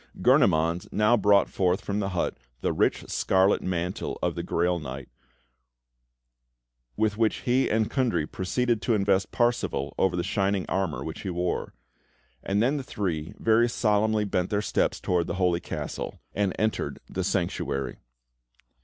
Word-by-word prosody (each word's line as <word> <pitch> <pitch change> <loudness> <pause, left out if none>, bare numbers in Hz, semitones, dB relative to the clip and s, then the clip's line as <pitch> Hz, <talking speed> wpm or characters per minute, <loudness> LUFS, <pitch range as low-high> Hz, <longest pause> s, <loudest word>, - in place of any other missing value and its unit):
Gurnemanz 85 +2 +3
now 105 +3 +4
brought 100 -2 +4
forth 90 +1 0
from 100 +1 -2
the 100 -2 -1
hut 90 -3 -1 0.3
the - - 0
rich - - +1
scarlet 95 +1 +2
mantle 90 0 -3
of - - +1
the - - -4
Grail 85 +1 0
Knight, 65 -3 -7 1.9
with 105 -1 +1
which 110 -1 +1
he 130 +2 +2
and 110 -1 +2
Kundry 115 - 0
proceeded 115 +7 -1
to 115 - +1
invest 100 -2 +1
Parsifal 120 - 0
over 95 -2 +2
the 85 - -1
shining 95 0 0
armour 95 -4 -1
which 80 - -6
he 95 - -4
wore; 90 0 -2 0.7
and 100 +3 +1
then 135 +5 +2
the - - -2
three 85 -10 -3
very 115 +1 +3
solemnly 110 -2 +1
bent 90 -2 -1
their 105 - +1
steps - - 0
towards 90 -2 0
the 85 - -3
holy 90 -2 +2
castle - - -5
and 100 -2 +1
entered 110 0 -1
the - - -3
Sanctuary. 70 -3 -2
95 Hz, 155 wpm, -26 LUFS, 90-110 Hz, 1.9 s, now